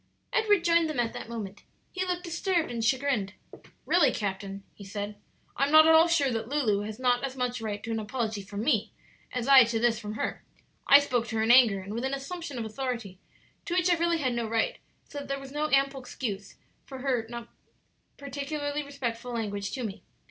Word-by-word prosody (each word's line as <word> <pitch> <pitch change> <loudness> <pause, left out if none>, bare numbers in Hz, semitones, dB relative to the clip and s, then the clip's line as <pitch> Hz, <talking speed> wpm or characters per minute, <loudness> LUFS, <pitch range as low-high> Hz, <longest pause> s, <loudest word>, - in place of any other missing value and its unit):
Edward 415 -5 +3
joined 335 -2 +3
them 300 -5 -3
at 235 -1 0
that - - -7
moment. 205 -3 -6 0.3
He 370 - -2
looked 360 -1 -2
disturbed 345 -2 -1
and 235 -1 -3
chagrined. 250 -5 +1 0.5
"Really, 330 -7 +4
captain," 195 -1 -4
he 205 - -12
said, 205 +1 -5 0.4
"I 275 - +2
am - - -3
not 315 0 +8
at 320 - +7
all 325 +1 +7
sure 295 -6 +2
that 225 0 -3
Lulu 240 -9 +1
has 215 0 -7
not 250 0 +1
as 270 -1 -3
much 250 -1 -2
right 210 -2 -4
to 230 - -4
an 225 - -1
apology 220 -1 -3
from 200 +2 -6
me 230 -6 +1 0.4
as 250 -1 -3
I 270 -2 +9
to 230 -1 -1
this 230 -1 +2
from 210 0 -6
her. 220 - -3 0.4
I 280 - +10
spoke 245 -5 -1
to 225 - -5
her 220 - +1
in 225 - +4
anger, 235 -6 +6
and 195 +2 -7
with 235 +2 -3
an 265 +1 -1
assumption 290 0 -6
of 230 - -3
authority 225 -5 -4 0.5
to 345 - -2
which 360 0 +3
I - - +5
really 340 0 +1
had 260 -5 0
no 235 -1 -2
right, 225 0 0 0.3
so 290 - -7
that 285 - -8
there 275 0 -2
was 275 0 -10
ample 275 -2 +1
excuse 215 -6 -6 0.3
for 265 - -9
her 250 -4 0
not 235 -1 -7 0.7
particularly 285 +1 -3
respectful 250 -4 -5
language 205 -4 -3
to 260 - -3
me. 205 -3 -5
250 Hz, 215 wpm, -28 LUFS, 220-285 Hz, 0.7 s, I